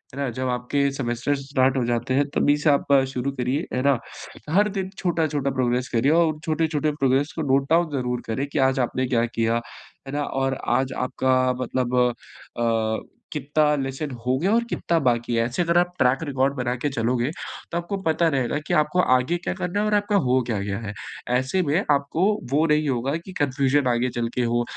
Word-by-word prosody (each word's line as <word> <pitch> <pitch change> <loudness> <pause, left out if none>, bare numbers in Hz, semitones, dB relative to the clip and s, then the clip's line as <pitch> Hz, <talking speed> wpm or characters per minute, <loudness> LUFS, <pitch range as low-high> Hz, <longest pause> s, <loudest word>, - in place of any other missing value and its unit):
है - - -6
ना? 140 - 0
जब 130 +2 -3
आपके 125 +3 0
सेमेस्टर्स 135 +1 -2
स्टार्ट 130 -1 +2
हो 125 - +1
जाते 120 +1 -1
हैं, 140 +2 +3
तभी 145 +1 +3
से 150 +1 +2
आप 140 0 +1 0.2
शुरू 130 +2 -2
करिए, 130 +4 -2
है 125 - 0
ना? 140 -2 +4 0.5
हर 205 +5 +4
दिन 190 -2 -3
छोटा-छोटा 155 -6 0
प्रोग्रेस 125 -1 0
करिए 125 +6 +3
और 170 0 +4
उन 150 - -13
छोटे-छोटे 155 -1 0
प्रोग्रेस 135 +2 +2
को - - -1
नोट 135 0 +2
डाउन 170 0 +4
ज़रूर 125 -1 -2
करें, 130 +5 -2
कि 145 - -3
आज 135 - -2
आपने 130 +2 -2
क्या 120 -2 +2
किया, 115 0 0 0.5
है 135 - -6
ना? 145 0 0
और 135 -1 -1 0.2
आज 130 0 -2
आपका 130 0 +1 0.2
मतलब 125 -1 -1 0.6
अ, 115 -2 0 0.3
कितना 150 +1 +1
लेसन 135 +2 -4
हो 130 +1 +2
गया 185 +6 +1
और 235 - +3
कितना 170 - 0
बाकी 120 0 +1
है? 115 0 +2
ऐसे 120 +8 -2
अगर 170 0 +2
आप 175 0 +2
ट्रैक 130 +2 +3
रिकॉर्ड 135 -2 0
बना 125 -2 -1
के 145 - +2
चलोगे, 125 +1 0 0.4
तो 170 - -1
आपको 175 +4 -3
पता 165 0 +2
रहेगा 130 +2 0
कि - - 0
आपको 150 +4 -1 0.2
आगे 130 +7 +1
क्या 175 - -3
करना 185 +1 -2
है 210 - +1
और 210 - 0
आपका 205 0 +1
हो 130 +1 +3
क्या 110 -4 -1
गया 100 -1 -3
है। 105 -2 -6 0.4
ऐसे 130 +9 0
में 160 +5 +1
आपको 140 +4 +1 0.3
वो 150 +3 +3
नहीं 150 0 +2
होगा 130 +3 -1
कि 190 - -9
कन्फ्यूज़न 140 -1 +2
आगे 120 +2 0
चल 120 -1 0
के 125 - +1
हो 120 0 +1
135 Hz, 210 wpm, -24 LUFS, 125-155 Hz, 0.6 s, ना